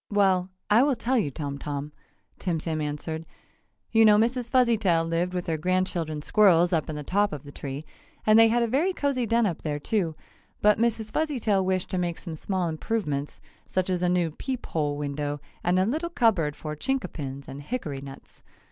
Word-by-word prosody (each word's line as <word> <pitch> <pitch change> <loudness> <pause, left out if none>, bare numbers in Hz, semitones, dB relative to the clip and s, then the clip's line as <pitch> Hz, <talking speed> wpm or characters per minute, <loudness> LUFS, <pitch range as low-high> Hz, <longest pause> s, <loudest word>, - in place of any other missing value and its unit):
"Well, 190 -3 +2 0.2
I 215 +3 +5
will 280 0 +3
tell 245 +2 +1
you, 180 - 0
Tom 140 0 -5
Tom," 145 0 -4 0.5
Tim 175 -3 -1
Tim 155 0 -2
answered, 150 +2 -4 0.7
"You 225 -1 +5
know 210 -1 +7
Mrs. 240 +2 +1
Fuzzytail 220 -10 +3
lived 170 +2 -1
with 180 - -2
her 160 -2 -1
grandchildren 175 -3 -1
squirrels 180 -3 +4
up 160 -2 0
in 155 - -3
the 150 - -5
top 205 +7 +1
of 150 -3 -6
the 145 - -10
tree, 140 +2 -6 0.4
and 215 +1 +6
they 225 - +8
had 235 +1 +2
a - - +1
very 300 +11 +1
cozy 275 -7 0
den 230 +1 +3
up 175 -6 -2
there, 150 -2 -2
too, 165 +1 -1 0.4
but 210 +1 +4
Mrs. 225 -2 0
Fuzzytail 240 -11 +1
wished 185 -1 -1
to 185 - 0
make 175 -2 -1
some 165 -4 -6
small 185 +2 -1
improvements, 155 -4 -3 0.3
such 185 0 -1
as 180 -1 0
a 180 - +2
new 175 -2 +1
peep 255 - -5
hole 145 -2 -1
window 145 0 -3 0.2
and 180 +1 +2
a 185 - +3
little 315 - -1
cupboard 200 - +2
for 155 -1 -5
Chinkapins 150 - -3
and 135 +1 -7
hickory 150 - -4
nuts. 135 -1 -11
180 Hz, 195 wpm, -26 LUFS, 150-225 Hz, 0.7 s, they